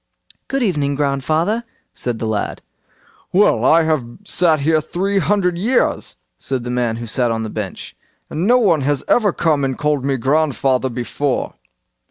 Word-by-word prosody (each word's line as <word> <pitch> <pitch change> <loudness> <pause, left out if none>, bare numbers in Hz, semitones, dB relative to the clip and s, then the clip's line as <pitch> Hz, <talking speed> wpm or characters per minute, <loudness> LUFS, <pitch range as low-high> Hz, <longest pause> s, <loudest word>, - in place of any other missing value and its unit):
"Good 270 -1 -1
evening, 145 -9 0
grandfather!" 155 - 0 0.3
said 120 -2 -3
the 115 - -4
lad. 110 -2 -3 0.7
"Well, 195 - +4
here 160 +6 +4
I've 135 - -6
sat 170 -5 +3 0.3
three 195 +4 -1
hundred 180 -2 +1
years", 240 +6 0 0.2
said 130 -3 -3
the 120 - -4
man 120 -2 0
who 120 +1 -6
sat 120 +1 0
on 115 -1 -1
the 110 - -5
bench, 105 -3 -6 0.3
"and 165 +5 -2
no 245 +2 +6
one 180 - +3
has 140 0 0
ever 215 -5 +3
come 155 -4 +1
and 130 -2 -1
called 150 -2 0
me 135 -1 0
grandfather 135 -1 +1
before." 125 +3 -2
145 Hz, 160 wpm, -19 LUFS, 125-180 Hz, 0.7 s, no